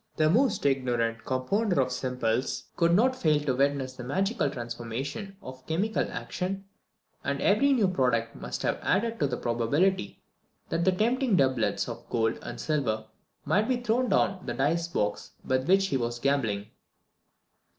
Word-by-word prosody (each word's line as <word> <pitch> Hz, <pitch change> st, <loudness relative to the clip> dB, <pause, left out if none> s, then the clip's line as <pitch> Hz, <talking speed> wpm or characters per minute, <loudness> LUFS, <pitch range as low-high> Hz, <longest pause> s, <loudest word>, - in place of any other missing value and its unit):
The 155 Hz, 0 st, +4 dB
most 225 Hz, -, +2 dB
ignorant 120 Hz, -4 st, 0 dB
compounder 175 Hz, -, 0 dB
of 130 Hz, -1 st, +1 dB
simples 125 Hz, -1 st, -1 dB
could 170 Hz, 0 st, +3 dB
not 255 Hz, +6 st, +3 dB
fail 155 Hz, -11 st, +2 dB
to 145 Hz, -3 st, 0 dB
witness 135 Hz, -1 st, +1 dB
the 125 Hz, -, -8 dB
magical 195 Hz, -, 0 dB
transformations 120 Hz, -, -5 dB
of 130 Hz, 0 st, -10 dB
chemical 195 Hz, +8 st, 0 dB
action; 195 Hz, +2 st, -4 dB, 0.6 s
and -, -, -1 dB
every 280 Hz, +1 st, +3 dB
new 230 Hz, -7 st, +4 dB
product 125 Hz, -9 st, +1 dB
must -, -, -5 dB
have -, -, 0 dB
added 225 Hz, +4 st, 0 dB
to 145 Hz, -, +2 dB
the 125 Hz, -2 st, -3 dB
probability 120 Hz, -, 0 dB, 0.5 s
that 170 Hz, -, 0 dB
the 190 Hz, -, +5 dB
tempting 235 Hz, +4 st, +1 dB
doublets 130 Hz, -7 st, +1 dB
of -, -, -8 dB
gold 110 Hz, -1 st, 0 dB
and -, -, -7 dB
silver 115 Hz, -9 st, -1 dB, 0.4 s
might 205 Hz, +9 st, +2 dB
be 255 Hz, -1 st, +2 dB
thrown 245 Hz, +1 st, +1 dB
from 185 Hz, -1 st, +1 dB
the 120 Hz, -, -4 dB
dice 160 Hz, +6 st, +1 dB
box 105 Hz, -11 st, -2 dB
with 130 Hz, +1 st, 0 dB
which 195 Hz, +1 st, +4 dB
he 135 Hz, -, +1 dB
was 120 Hz, -1 st, -2 dB
gambling. 120 Hz, -6 st, 0 dB
140 Hz, 160 wpm, -28 LUFS, 125-195 Hz, 0.6 s, the